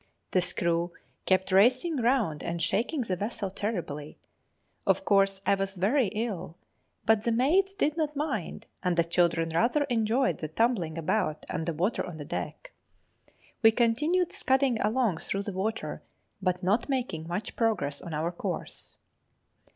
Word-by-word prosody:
The 185 Hz, -, +3 dB
screw 170 Hz, 0 st, 0 dB, 0.3 s
kept 190 Hz, 0 st, +2 dB
racing 255 Hz, -, +4 dB
round 235 Hz, -, +1 dB
and 170 Hz, 0 st, -3 dB
shaking 235 Hz, -, 0 dB
the 195 Hz, -6 st, -1 dB
vessel 200 Hz, 0 st, -3 dB
terribly. 175 Hz, -8 st, -4 dB, 0.7 s
Of -, -, +2 dB
course 195 Hz, -1 st, +3 dB
I -, -, +4 dB
was 195 Hz, 0 st, -2 dB
very 215 Hz, +7 st, +2 dB
ill; 205 Hz, -5 st, -4 dB, 0.5 s
but 220 Hz, -1 st, +4 dB
the 235 Hz, -, 0 dB
maids 350 Hz, +12 st, +3 dB
did 305 Hz, -6 st, +1 dB
not 300 Hz, -2 st, -1 dB
mind, 275 Hz, -, -3 dB, 0.2 s
and 180 Hz, -2 st, 0 dB
the 170 Hz, -, +5 dB
children 170 Hz, -1 st, +1 dB
rather 240 Hz, -, +3 dB
enjoyed 230 Hz, +3 st, +1 dB
the 155 Hz, -, -3 dB
tumbling 175 Hz, -3 st, 0 dB
about 165 Hz, -2 st, -1 dB
and 165 Hz, -2 st, -3 dB
the 170 Hz, -, 0 dB
water 180 Hz, +8 st, 0 dB
on 175 Hz, -3 st, -7 dB
deck. 160 Hz, -, -5 dB, 0.9 s
We 225 Hz, -, +8 dB
continued 300 Hz, +11 st, +2 dB
scudding 265 Hz, -3 st, +2 dB
along 215 Hz, -4 st, +1 dB
through 195 Hz, +1 st, -2 dB
the 205 Hz, -, -4 dB
water, 205 Hz, +4 st, -3 dB, 0.4 s
but 180 Hz, -1 st, 0 dB
not 210 Hz, +9 st, +1 dB
making 240 Hz, -, -2 dB
much 185 Hz, +6 st, -4 dB
progress 215 Hz, -11 st, 0 dB
on 170 Hz, -, -7 dB
our 160 Hz, +2 st, -1 dB
course. 175 Hz, -, -5 dB
200 Hz, 150 wpm, -28 LUFS, 175-245 Hz, 0.9 s, We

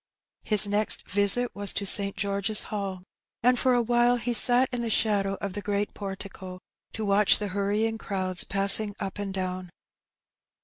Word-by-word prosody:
His 210 Hz, -1 st, +6 dB
next 205 Hz, +1 st, 0 dB
visit 205 Hz, +5 st, +3 dB
was 200 Hz, 0 st, +2 dB
to 200 Hz, -, -5 dB
St. 200 Hz, 0 st, +4 dB
George's 200 Hz, +1 st, +2 dB
Hall, 195 Hz, -3 st, -6 dB, 0.4 s
and 250 Hz, 0 st, +2 dB
for 255 Hz, -2 st, +1 dB
a 240 Hz, -, 0 dB
while 240 Hz, +1 st, +1 dB
he 240 Hz, 0 st, -4 dB
sat 245 Hz, +2 st, +3 dB
in 245 Hz, -, -3 dB
the 235 Hz, -, -4 dB
shadow 200 Hz, -3 st, 0 dB
of 200 Hz, -1 st, -7 dB
the 205 Hz, -, -5 dB
great 205 Hz, 0 st, -4 dB
portico 195 Hz, -2 st, -9 dB, 0.4 s
to 220 Hz, -, -6 dB
watch 200 Hz, 0 st, +3 dB
the 205 Hz, -1 st, -5 dB
hurrying 205 Hz, +3 st, -3 dB
crowds 185 Hz, -4 st, -4 dB
passing 200 Hz, +1 st, +1 dB
up 195 Hz, +1 st, -7 dB
and 200 Hz, -1 st, -5 dB
down. 185 Hz, -1 st, -6 dB
205 Hz, 170 wpm, -25 LUFS, 195-220 Hz, 0.4 s, His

